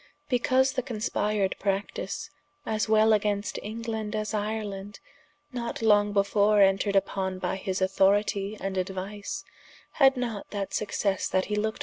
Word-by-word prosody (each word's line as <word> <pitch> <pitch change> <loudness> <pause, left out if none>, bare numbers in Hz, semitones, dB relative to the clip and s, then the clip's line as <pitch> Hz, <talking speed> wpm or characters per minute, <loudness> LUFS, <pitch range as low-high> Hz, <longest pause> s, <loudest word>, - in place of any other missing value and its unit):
because 260 +1 +3
the 260 - 0
conspired 210 -4 -1
practise, 195 0 -3 0.3
as 215 0 -1
wel 220 0 +5
against 205 -1 0
England 220 0 -4
as 215 0 -2
Ireland, 205 -1 -3 0.5
not 235 -2 -4
long 205 -1 +4
before 205 +1 +3
entred 195 +1 +3
vpon 190 -1 0
by - - -1
his 190 0 -2
authoritie 200 +2 +2
and 195 -1 -3
aduise, 195 +8 -4 0.5
had 270 -2 +4
not 235 -5 -3
that 200 -2 -4
successe 200 -2 0
that 185 0 +1
he 210 - -2
looked 220 +1 -1
for. - - -20
210 Hz, 140 wpm, -27 LUFS, 195-220 Hz, 0.5 s, wel